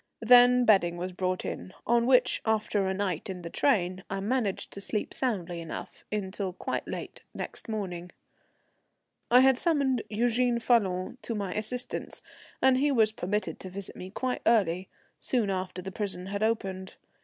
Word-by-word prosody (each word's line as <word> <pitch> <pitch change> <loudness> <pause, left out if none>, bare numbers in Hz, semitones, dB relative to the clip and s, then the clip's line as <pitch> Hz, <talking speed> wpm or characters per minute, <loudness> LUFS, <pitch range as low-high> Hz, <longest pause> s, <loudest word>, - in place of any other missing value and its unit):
Then 245 +1 +7
bedding 175 -6 +4
was 180 +2 -4
brought 185 0 -2
in, 185 - -6
on 235 +1 +3
which, 255 -1 +4
after 215 -3 +1
a 190 - 0
night 190 -3 -2
in 180 -2 -6
the 170 - -6
train, 185 -8 +1
I 195 - -2
managed 210 -1 -1
to 200 - -7
sleep 210 +1 -3
soundly 180 -9 -2
enough 165 - -8
until 195 -2 -3
quite - - -4
late - - -6
next - - -6
morning. 180 -5 -4 1.2
I 250 +1 +7
had 265 -1 +5
summoned 280 -7 +2
Eugène 240 +2 +1
Falloon 205 -2 +1
to 230 - -4
my 200 -3 -3
assistance, 245 +4 -3 0.4
and 260 -1 +6
he 290 +1 +3
was 220 -5 +4
permitted 210 0 -2
to 190 - -8
visit 195 +1 -5
me 185 - -8
quite 250 +5 -2
early, 190 -5 +2 0.3
soon 230 -6 0
after 185 -1 -4
the 190 - -5
prison 190 -2 -3
had 200 +2 -4
opened. 195 -4 -1
205 Hz, 165 wpm, -28 LUFS, 185-240 Hz, 1.2 s, Then